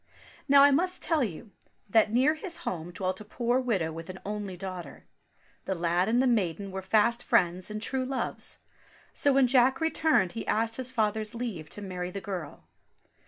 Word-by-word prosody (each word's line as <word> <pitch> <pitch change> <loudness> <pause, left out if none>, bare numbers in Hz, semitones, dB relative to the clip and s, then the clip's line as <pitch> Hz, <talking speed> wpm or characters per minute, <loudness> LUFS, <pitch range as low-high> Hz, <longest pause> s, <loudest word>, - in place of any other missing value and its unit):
Now, 280 0 +7
I 285 - +7
must 360 +6 +1
tell 320 -4 +2
you 205 +1 -6 0.4
that 210 +1 +3
near 260 +6 +4
his 340 +2 -7
home 170 -1 -3
dwelt 185 +2 -3
a - - -7
poor 240 +4 0
widow 200 -11 0
with 165 +2 -8
an 185 - -6
only 205 -3 -4
daughter. 185 -1 -7 0.6
The 190 - -1
lad 175 +3 +1
and 235 +2 +3
the 260 - +3
maiden 200 -5 0
were 190 0 -4
fast 220 +4 +2
friends 180 -5 +1
and 215 0 -4
true 260 +4 -2
loves. 260 0 -3 0.6
So 285 - +2
when 270 -1 +5
Jack 255 +2 +4
returned 315 - +2
he 230 - -6
asked 225 +1 +1
his 255 -1 -1
father's 215 -2 -1
leave 210 -11 -5
to 205 - -6
marry 180 -2 -4
the 195 - -5
girl. 185 -5 -6
215 Hz, 185 wpm, -28 LUFS, 185-255 Hz, 0.6 s, Now